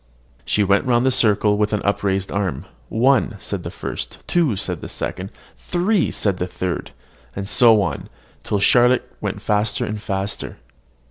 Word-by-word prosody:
She 105 - +2
went 100 0 +2
round 120 0 +2
the 130 - +4
circle 105 -3 +3
with 105 0 +1
upraised 100 -2 0
arm. 100 -1 -2 0.2
"One," 125 -1 +2
said 100 -1 -5
the - - -6
first; - - -6
"two," 165 -10 +1
the - - -3
second; 95 +2 -4 0.3
"three," 180 +2 +1
the 90 -3 -1
third; 90 -1 -4 0.5
and 100 0 -4
so 115 -3 +5
on, 85 - -4 0.3
till 105 - -1
Charlotte 120 +5 +4
went - - -4
faster 105 0 0
and 105 0 -5
faster. 95 -1 -3
105 Hz, 145 wpm, -21 LUFS, 100-120 Hz, 0.5 s, so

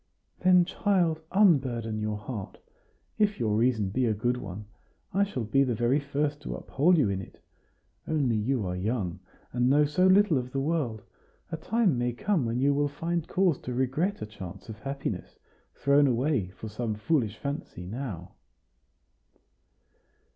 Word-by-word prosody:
"Then, 180 -1 +5
child, 180 -4 +1
unburden 130 - +3
your 105 0 -2
heart. 105 -2 -7 0.6
If 210 -5 +2
your 110 -3 +1
reason 110 -3 +2
be 125 +3 +1
a 110 - +1
good 120 +4 0
one, 100 -2 -7 0.5
I 200 +2 +3
shall 165 - -3
be 125 +6 +3
the 125 -3 0
very 120 +6 +2
first 145 +1 -2
to - - -5
uphold 170 +6 +2
you 145 - +3
in 95 -1 -1
it. - - -13 0.7
Only 140 -7 +1
you 110 +1 0
are 90 0 -2
young, 95 -2 -2 0.3
and 125 +1 +2
know 145 +2 +5
so 150 +6 +3
little 185 -6 +5
of 125 0 -7
the 135 - 0
world. 135 - -1 0.5
A 160 - -2
time 190 - +1
may 120 0 0
come 170 - 0
when 115 +2 -1
you 140 +2 +3
will 145 +1 +2
find 165 +3 -3
cause 180 -6 +2
to 125 - -5
regret 150 +11 0
a - - -3
chance 100 -1 -10
of 110 -1 -8
happiness 135 -8 -5 0.4
thrown 140 +1 +4
away 125 -5 +1
for 95 +4 -9
some 110 +1 -3
foolish 110 -3 0
fancy 140 - -5
now." 100 -5 -6
130 Hz, 165 wpm, -28 LUFS, 110-155 Hz, 0.7 s, Then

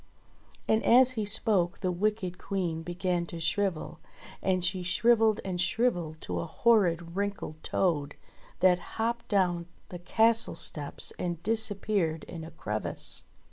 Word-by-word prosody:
And 220 0 +2
as 255 +1 +5
he 220 -4 -3
spoke 200 -4 +1
the 185 -2 -1
wicked 185 -1 -2
Queen 175 -5 -3
began 175 0 -3
to 170 - -8
shrivel, 180 +1 -2 0.4
and 185 -2 0
she 185 +1 -1
shrivelled 220 +4 +2
and 180 -2 -3
shrivelled 175 -6 -1
to - - -4
a - - -4
horrid 170 -4 +1
wrinkled 200 -6 -4
toad 150 -6 -1 0.5
that 180 -1 +4 0.2
hopped 235 +1 -2
down 175 -4 0 0.2
the 175 - -8
castle 225 +3 +3
steps 150 -3 +2
and 170 -2 -4
disappeared 205 -6 0
in 165 -2 -9
a 160 - -9
crevice. 105 -10 +2
180 Hz, 140 wpm, -28 LUFS, 170-215 Hz, 0.5 s, as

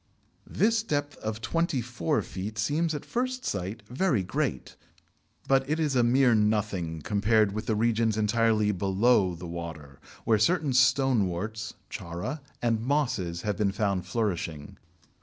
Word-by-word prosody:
This 225 +1 +2
depth 145 -8 -2
of 110 0 -5
twenty 165 0 0
four 115 -8 -1
feet 105 +3 -6
seems 155 +9 0
at 145 - -6
first 255 +1 -2
sight 100 +2 -3
very 125 - +1
great, 65 -7 -3 0.7
but 135 0 +2
it 155 +2 0
is 150 -4 0
a 125 - +4
mere 125 +1 +4
nothing 105 -7 0
compared 105 +1 +2
with 110 +2 -5
the 110 - +1
regions 110 0 +1
entirely 110 0 +2
below 95 0 +2
the 90 +2 -9
water, 80 -5 -7 0.2
where 110 -2 +3
certain 155 - +2
Stoneworts 110 -5 +1 0.2
(Chara) 90 - -5 0.2
and 115 -2 +1
Mosses 120 - -1
have 105 -2 -1
been 105 -2 +1
found 95 -3 -1
flourishing. 90 -8 -3
110 Hz, 140 wpm, -28 LUFS, 95-130 Hz, 0.7 s, a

